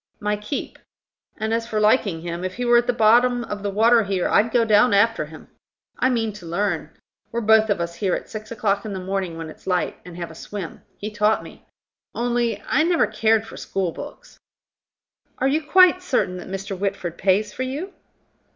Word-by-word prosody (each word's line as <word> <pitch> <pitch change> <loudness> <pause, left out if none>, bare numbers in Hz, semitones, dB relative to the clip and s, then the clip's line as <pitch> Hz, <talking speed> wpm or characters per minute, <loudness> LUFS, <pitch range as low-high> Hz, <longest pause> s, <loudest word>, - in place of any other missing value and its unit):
"My 210 0 0
keep. 210 +7 -5 0.6
And, 220 +1 -2
as 230 0 -1
for 220 -2 -1
liking 210 -6 +2
him, 170 +1 -5
if 185 0 -4
he 245 - -3
were 240 0 +5
at 240 - -3
the - - +4
bottom 240 +2 +4
of 210 -2 -6
the 205 - -2
water 225 +4 +4
here, 195 -3 -1
I'd 220 +3 +3
go 230 0 +2
down 210 +1 +4
after 215 -5 +3
him. 155 0 -13 0.5
I 255 - +3
mean 225 -4 0
to 195 -4 -11
learn. 175 -2 -1 0.4
We're 235 - -2
both 220 0 +4
of 205 - +1
us 170 0 -3
here 185 +1 0
at - - -6
six 215 +1 -8
o'clock 205 -3 0
in 215 -2 -5
the 190 - -4
morning, 185 -2 -3
when 165 -1 -6
it's - - -17
light, 180 -2 0
and 175 -1 -11
have 170 -1 -5
a - - -11
swim. 180 +1 -7 0.2
He 210 +1 -5
taught 215 0 +1
me. - - -14 0.5
Only, 235 -2 0
I 275 - +2
never 335 +1 +3
cared 220 0 +1
for - - -11
schoolbooks." 195 - -5 1.0
"Are 265 - +1
you 295 +4 +1
quite 365 +3 +5
certain 250 - 0
that 180 - -9
Mr. 195 +1 -4
Whitford 185 -3 -3
pays 200 +3 +2
for - - -6
you." 290 +9 -4
210 Hz, 205 wpm, -22 LUFS, 190-235 Hz, 1.0 s, were